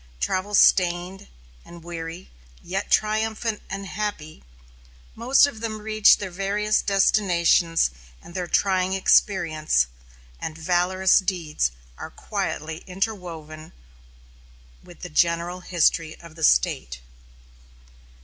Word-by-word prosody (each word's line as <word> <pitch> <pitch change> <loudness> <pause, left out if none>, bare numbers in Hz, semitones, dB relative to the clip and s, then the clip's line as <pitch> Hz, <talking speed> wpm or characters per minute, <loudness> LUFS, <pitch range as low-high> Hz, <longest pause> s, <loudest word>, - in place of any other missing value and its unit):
Travel 185 - -1
stained 180 0 +2 0.4
and 170 -1 -13
weary, 170 +1 -8 0.3
yet 190 +3 -4
triumphant 220 +1 0
and 195 +1 -5
happy, 195 - -5 0.7
most 255 +5 +4
of 280 -6 -6
them 220 -2 -4
reach 215 0 +4
their 190 -2 -6
various 205 +3 0
destinations, 175 - +2 0.3
and 170 - -14
their 180 -1 -4
trying 190 0 +1
experiences 165 - +2 0.5
and 160 0 -6
valorous 180 +3 +2
deeds 170 - -1 0.3
are - - -7
quietly 155 +1 -4
interwoven 175 -6 -5 1.1
with - - -16
the - - -7
general 170 - 0
history 165 -2 0
of 170 -2 -13
the 160 - -8
State. - - +2
180 Hz, 105 wpm, -23 LUFS, 165-200 Hz, 1.1 s, most